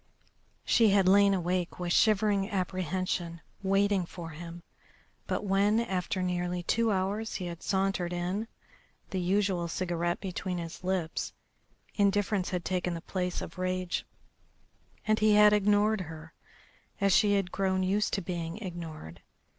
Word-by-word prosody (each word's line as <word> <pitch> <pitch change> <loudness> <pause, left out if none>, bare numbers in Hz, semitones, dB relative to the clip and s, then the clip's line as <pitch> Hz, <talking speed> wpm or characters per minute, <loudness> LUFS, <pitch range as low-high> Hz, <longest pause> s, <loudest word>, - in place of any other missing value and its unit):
She 225 -2 +5
had 195 -2 +4
lain 200 +1 +6
awake 180 0 -2
with 175 -1 -1
shivering 205 -2 +3
apprehension 185 -2 -2 0.2
waiting 195 0 +2
for 170 -2 -8
him, 170 +2 -9 0.6
but - - -2
when, 200 +3 +3
after 185 -4 -1
nearly 180 0 -1
two 230 +4 +2
hours, 200 +3 -1
he 185 - -3
had 170 -1 -6
sauntered 190 -2 0
in, 180 +5 -2 0.6
the 190 - -1
usual 185 -1 +1
cigarette 175 0 -1
between 185 -1 -4
his 170 +1 -7
lips, 180 -3 -2 0.6
indifference 205 -2 +1
had 180 -2 -3
taken 180 -1 -1
the 165 - -6
place 180 0 -3
of 175 - -9
rage, 185 -1 -1 1.0
and 215 -1 +2
he 215 -1 +4
had 210 0 +7
ignored 210 0 +3
her, 160 -1 -9 0.7
as 200 -2 +4
she 205 -1 +4
had 195 -3 0
grown 190 -1 0
used 200 +3 +1
to 195 - 0
being 170 -1 -4
ignored. 165 - -7
185 Hz, 140 wpm, -29 LUFS, 175-200 Hz, 1.0 s, had